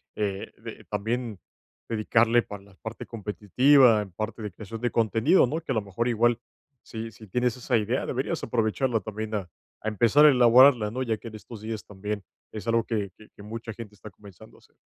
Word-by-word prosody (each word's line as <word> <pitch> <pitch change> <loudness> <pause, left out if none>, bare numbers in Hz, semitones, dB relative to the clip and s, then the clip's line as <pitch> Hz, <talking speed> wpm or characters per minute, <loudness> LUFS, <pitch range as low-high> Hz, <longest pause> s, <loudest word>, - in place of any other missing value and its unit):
eh, 100 -2 -3
de - - -10
también 110 +1 -3 0.5
dedicarle 115 +1 +3
para 100 -1 -9
la 100 -1 -19
parte 110 +3 -8
competitiva, 115 +3 +3
en 100 -2 -8
parte 110 +5 -5
de 105 -1 -5
creación 110 +4 -9
de 120 - 0
contenido, 115 - +3
¿no?, 160 +6 -3
que, 155 - -5
a - - 0
lo 110 - +1
mejor, 100 +4 -3
igual, 120 0 +2 0.4
si 115 0 -7
si 110 0 -14
tienes 125 +4 0
esa 125 -1 +1
idea, 115 +4 -1
deberías 135 +6 -2
aprovecharla 115 +1 0
también 110 +2 -6
a 95 -4 -4 0.3
a - - -6
empezar 115 +8 +4
a - - +9
elaborarla, 125 -2 +6
¿no? 130 +3 -2
Ya 115 -3 -1
que 115 - -11
en 110 - -11
estos 110 0 -11
días 110 -1 -5
también 105 0 -5 0.3
es 110 +1 -8
algo 115 0 +2
que 105 -4 -2
que 110 - -17
que 100 - -15
mucha 115 +2 -7
gente 110 -2 -10
está 105 - -11
comenzando 100 +2 -16
a - - -20
hacer. - - -27
110 Hz, 205 wpm, -26 LUFS, 105-120 Hz, 0.5 s, a